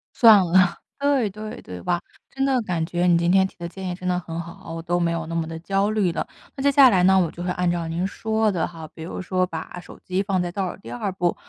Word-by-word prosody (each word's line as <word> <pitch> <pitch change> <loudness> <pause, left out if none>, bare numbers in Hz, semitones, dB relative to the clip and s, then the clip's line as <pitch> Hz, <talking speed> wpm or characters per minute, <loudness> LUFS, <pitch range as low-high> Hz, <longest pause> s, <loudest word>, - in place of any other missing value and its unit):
算 215 -6 +7
了。 180 +1 +3 0.2
对， 280 -5 +2
对， 215 +1 -7
对 90 -1 -8
吧， 175 -1 0 0.3
真 270 0 -1
的 265 -2 +2
感 175 -6 -1
觉 175 +1 0
你 175 -1 +5
今 170 +1 +2
天 190 0 +4
提 - - -20
的 170 -1 -5
建 190 +1 -6
议 180 - -3
真 185 0 -6
的 180 -1 +1
很 165 -1 -6
好， 170 +3 -9
我 165 - -5
都 175 +1 0
没 170 -1 +1
有 165 -1 -2
那 165 - -6
么 165 -1 -1
地 165 0 -6
焦 195 +4 0
虑 210 -5 +1
了。 - - -3 0.3
那 270 - -5
接 280 - +4
下 275 -2 +7
来 185 -3 +3
呢， 190 +1 +6
我 170 -3 +1
就 175 - -9
会 180 - -2
按 180 0 0
照 170 -1 -1
您 170 +3 -2
说 220 +2 0
的 175 -3 -1
哈， 160 -2 -9
比 160 - -11
如 165 - -6
说 185 0 0
把 165 +1 -7
手 175 - -13
机 185 +1 0
放 195 -2 0
在 175 -1 -2
倒 190 -1 -2
数 - - -12
第 115 - -10
2 120 +11 -3
步， 180 -2 0
180 Hz, 300 characters per minute, -23 LUFS, 170-195 Hz, 0.3 s, 算